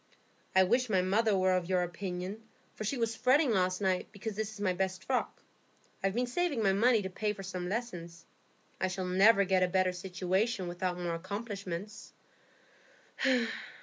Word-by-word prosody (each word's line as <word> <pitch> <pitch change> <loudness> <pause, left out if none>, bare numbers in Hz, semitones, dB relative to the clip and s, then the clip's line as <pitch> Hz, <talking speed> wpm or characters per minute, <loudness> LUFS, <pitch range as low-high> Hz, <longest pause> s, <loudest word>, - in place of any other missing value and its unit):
"I 190 - +7
wish 240 +6 +2
my 190 -3 +3
mother 205 +2 +2
were 185 0 +3
of 180 -1 -2
your 180 -1 +2
opinion, 180 +3 -5 0.3
for - - -6
she 235 +6 -1
was 230 -1 0
fretting 260 +3 +3
last 185 -2 +1
night 190 -2 +1
because 210 +1 -6
this 215 0 -3
is 215 - -11
my 190 -3 +1
best 190 0 -2
frock. 255 +3 -2 0.6
I've 195 +1 +1
been 245 +1 +1
saving 280 -2 0
my 195 -1 +4
money 225 +1 +4
to 190 - -3
pay 210 +2 -1
for 195 -1 -9
some 180 -1 -4
lessons; 175 -7 -5 0.5
I 185 - +1
shall 185 0 -3
never 195 +3 +5
get 190 -1 +2
a 185 - +4
better 185 0 +2
situation 185 +3 -1
without 175 +1 -2
more 175 -1 -2
accomplishments." 200 +1 -6
190 Hz, 175 wpm, -31 LUFS, 185-220 Hz, 0.6 s, I